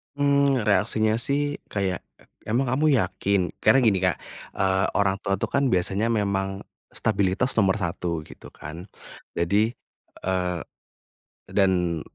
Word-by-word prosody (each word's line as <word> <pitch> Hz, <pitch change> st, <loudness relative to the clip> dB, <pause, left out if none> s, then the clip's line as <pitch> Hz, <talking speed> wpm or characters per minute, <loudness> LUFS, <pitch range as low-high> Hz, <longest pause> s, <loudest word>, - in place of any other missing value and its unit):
Mmm, 140 Hz, -4 st, +2 dB
reaksinya 110 Hz, +1 st, +2 dB
sih 145 Hz, +5 st, 0 dB, 0.2 s
kayak, 95 Hz, -3 st, -1 dB, 0.4 s
"Emang 120 Hz, +4 st, 0 dB
kamu 145 Hz, +5 st, +2 dB
yakin?" 100 Hz, -4 st, 0 dB, 0.2 s
Karena 135 Hz, -, +6 dB
gini, 105 Hz, -7 st, +2 dB
Kak, 90 Hz, -1 st, +1 dB, 0.3 s
eee, 95 Hz, 0 st, +1 dB
orang 95 Hz, -1 st, +2 dB
tua 100 Hz, -1 st, 0 dB
itu -, -, -1 dB
kan 140 Hz, -2 st, +1 dB
biasanya 95 Hz, +5 st, +1 dB
memang, 95 Hz, -2 st, -1 dB, 0.3 s
stabilitas 100 Hz, +4 st, 0 dB
nomor 100 Hz, -1 st, +3 dB
1 85 Hz, -2 st, -2 dB
gitu -, -, -13 dB
kan 80 Hz, +3 st, -9 dB, 0.5 s
jadi, 100 Hz, +7 st, +1 dB, 0.6 s
eee, 90 Hz, -2 st, 0 dB, 0.9 s
dan 90 Hz, -4 st, +2 dB
100 Hz, 125 wpm, -25 LUFS, 95-115 Hz, 0.9 s, Karena